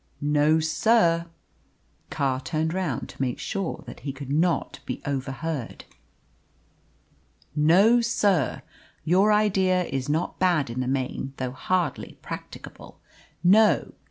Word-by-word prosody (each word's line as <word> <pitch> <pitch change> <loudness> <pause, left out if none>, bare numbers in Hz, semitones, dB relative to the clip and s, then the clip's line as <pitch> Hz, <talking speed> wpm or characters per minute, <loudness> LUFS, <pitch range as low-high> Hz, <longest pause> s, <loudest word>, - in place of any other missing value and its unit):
"No, 150 +2 +3
sir." 170 0 +2 0.8
Carr 135 -2 -1
turned 160 +2 -2
round 180 -9 -2
to - - -9
make 125 -2 -1
sure 195 -5 -4
that - - -10
he 140 - -4
could 135 0 -8
not 165 +3 0
be - - -4
overheard. 140 0 -4 1.7
"No, 190 +11 +5
sir. 200 - +1 0.4
Your 190 +6 +3
idea 190 -3 +2
is 135 -4 -4
not 160 +4 -1
bad 170 -9 +2
in 120 - -4
the 130 - -1
main, 130 0 -2
though 130 -1 -3
hardly 175 +2 -2
practicable. - - -9 0.4
No. 210 +4 +4
160 Hz, 120 wpm, -25 LUFS, 135-185 Hz, 1.7 s, No